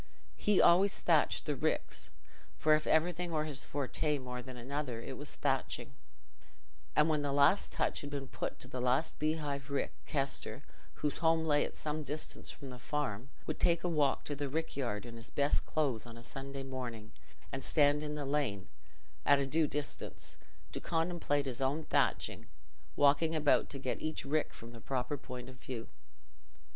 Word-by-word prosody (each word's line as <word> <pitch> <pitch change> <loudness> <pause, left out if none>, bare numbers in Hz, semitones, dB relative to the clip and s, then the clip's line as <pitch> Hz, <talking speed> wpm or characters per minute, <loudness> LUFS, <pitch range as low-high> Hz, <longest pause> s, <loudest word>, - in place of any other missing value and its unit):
He 210 -2 +3
always 190 +4 +6
thatched - - +3
the - - 0
ricks—for 155 - -1
if 155 0 +2
anything 175 +2 +2
were 155 -1 +1
his 145 -3 -3
forte 145 +2 0
more 125 -2 -5
than 125 0 -9
another, 130 -1 -3
it - - -6
was - - -3
thatching—and 65 - -3
when 155 -2 +2
the 145 -1 0
last 140 +8 +4
touch - - 0
had 145 - -6
been 140 -2 -4
put - - -4
to - - -8
the 125 - -4
last 130 +5 +1
beehive 150 -2 -1
rick, 140 - -1
Kester, 135 -3 -1 0.3
whose 150 - -1
home 160 -1 +3
lay 145 -2 +4
at - - -5
some 155 0 -2
distance 150 +2 -3
from 140 -3 -8
the 125 - -9
farm, 135 -3 -2 0.2
would 155 - -3
take 170 -1 +3
a - - +1
walk 150 -5 +2
to 145 - -2
the 140 0 -2
rick 160 +3 -2
yard 120 -6 -2
in 115 -1 -8
his 115 - -9
best 140 0 +1
clothes 135 -7 0
on 115 0 -9
a 115 - -11
Sunday 135 +2 -5
morning 125 -5 -5 0.4
and 135 - -4
stand 145 -1 +4
in 150 0 -3
the 145 -1 -3
lane, 135 -9 -1 0.5
at 145 +1 +6
a 140 - +1
due 155 +3 +2
distance, 145 0 -3 0.3
to - - -3
contemplate 165 -4 0
his 130 -1 -3
own 140 +4 +1
thatching, - - +1 0.5
walking 145 +3 +4
about 150 -2 +4
to 140 - -6
get 130 -2 -2
each 155 0 -3
rick 150 +2 +1
from 115 +1 -10
the 115 -1 -11
proper 130 +3 -1
point 125 -3 -7
of 130 0 -11
view. 120 -4 -6
140 Hz, 180 wpm, -34 LUFS, 130-155 Hz, 0.5 s, always